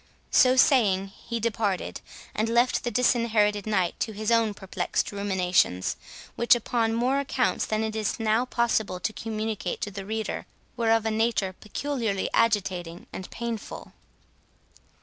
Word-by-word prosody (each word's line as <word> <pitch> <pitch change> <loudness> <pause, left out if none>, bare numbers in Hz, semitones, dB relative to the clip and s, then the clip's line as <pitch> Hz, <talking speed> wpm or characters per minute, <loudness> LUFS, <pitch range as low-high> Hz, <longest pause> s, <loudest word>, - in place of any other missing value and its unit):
So 255 -1 +6
saying, 205 -8 +4 0.2
he 235 0 -2
departed, 215 -4 -1 0.3
and 220 +1 0
left 240 +2 +2
the 240 - -1
Disinherited 220 -4 +2
Knight 190 -5 0
to 220 - -2
his 215 +2 -2
own 225 -3 +3
perplexed 190 -1 -2
ruminations; 185 - +1 0.4
which, 235 +1 +5
upon 230 -1 0
more 255 +4 +1
accounts 265 -2 0
than 215 0 0
it 220 0 -3
is 215 0 -1
now 225 +2 +2
possible 230 -6 0
to 215 +5 -2
communicate 215 -1 -3
to 205 - -3
the 195 0 -6
reader, 220 +2 -4 0.3
were 230 -1 0
of 225 -1 +3
a 220 - +1
nature 220 -3 0
peculiarly 220 -1 -3
agitating 185 -6 0
and 185 - -7
painful. 235 -2 -6
220 Hz, 145 wpm, -26 LUFS, 200-235 Hz, 0.4 s, So